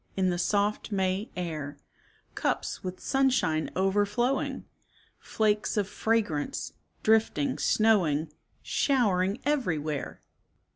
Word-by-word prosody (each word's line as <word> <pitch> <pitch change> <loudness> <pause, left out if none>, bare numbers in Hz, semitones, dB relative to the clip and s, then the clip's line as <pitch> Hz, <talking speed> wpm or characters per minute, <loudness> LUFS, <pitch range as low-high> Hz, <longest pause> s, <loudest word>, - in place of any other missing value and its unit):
In 185 -1 +2
the 175 - -2
soft 205 +3 0
May 190 +2 0
air; 155 -5 -4 0.6
Cups - - -2
with 185 0 -5
sunshine 260 - +1
overflowing 205 +7 0 0.3
— - - -33
Flakes 215 0 0
of 205 -2 +1
fragrance, 215 - -1 0.3
drifting, 215 -11 +2
snowing. 165 -10 +2 0.3
Showering 200 -7 +1
everywhere 160 - -1
195 Hz, 95 wpm, -28 LUFS, 165-220 Hz, 0.6 s, In